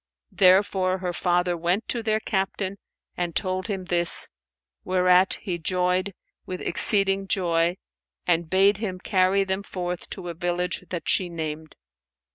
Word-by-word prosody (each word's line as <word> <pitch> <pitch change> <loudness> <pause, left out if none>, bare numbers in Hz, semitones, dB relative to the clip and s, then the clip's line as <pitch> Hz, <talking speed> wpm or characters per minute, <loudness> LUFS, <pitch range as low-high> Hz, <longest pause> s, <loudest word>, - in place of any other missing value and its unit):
Therefore 190 -1 +3
her 180 -1 -4
father 175 0 0
went 175 +6 -1
to 240 - -1
their 215 -1 0
Captain 195 -1 -3 0.4
and 175 -2 -3
told 185 +1 -2
him 195 -4 -4
this, 175 -2 +3 0.5
whereat 185 0 +3
he 180 -4 -3
joyed 180 +2 -1 0.3
with 185 0 -6
exceeding 195 -1 +3
joy 170 -2 +1 0.5
and 170 -2 +1
bade 195 +2 +4
him 200 -4 -4
carry 190 0 +2
them 190 0 -2
forth 180 -3 -5
to 175 - -7
a - - -4
village 175 +1 -2
that 175 -2 -4
she 185 -3 +2
named. 155 -2 -6
185 Hz, 140 wpm, -24 LUFS, 175-195 Hz, 0.5 s, bade